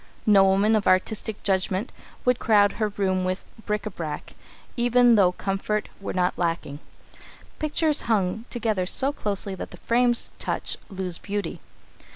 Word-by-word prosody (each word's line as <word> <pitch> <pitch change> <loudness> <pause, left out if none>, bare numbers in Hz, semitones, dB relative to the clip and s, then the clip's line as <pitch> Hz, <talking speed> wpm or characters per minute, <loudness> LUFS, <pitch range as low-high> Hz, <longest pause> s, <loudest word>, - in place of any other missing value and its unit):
No 205 -3 +6
woman 200 +3 +3
of 210 - 0
artistic 200 +3 0
judgment 190 +2 0 0.3
would 250 -1 +2
crowd 205 -2 +4
her 215 - -1
rooms 190 -2 -1
with 185 +1 -3 0.2
bric 210 -1 -1
à 215 - -6
brac, 155 -4 -6 0.4
even 245 0 +4
though 195 -5 +5
comfort 195 +3 -3
were 200 - -5
not 180 -1 -1
lacking. 165 -4 -2 0.8
Pictures 305 0 +1
hung 210 +1 0
together 215 -6 -1
so 275 +8 +6
closely 200 -5 -3
that 190 - -7
the 180 - -12
frames 240 +4 +2
touch - - -3
lose 185 -3 -1
beauty. 200 -4 -4
205 Hz, 150 wpm, -24 LUFS, 185-225 Hz, 0.8 s, No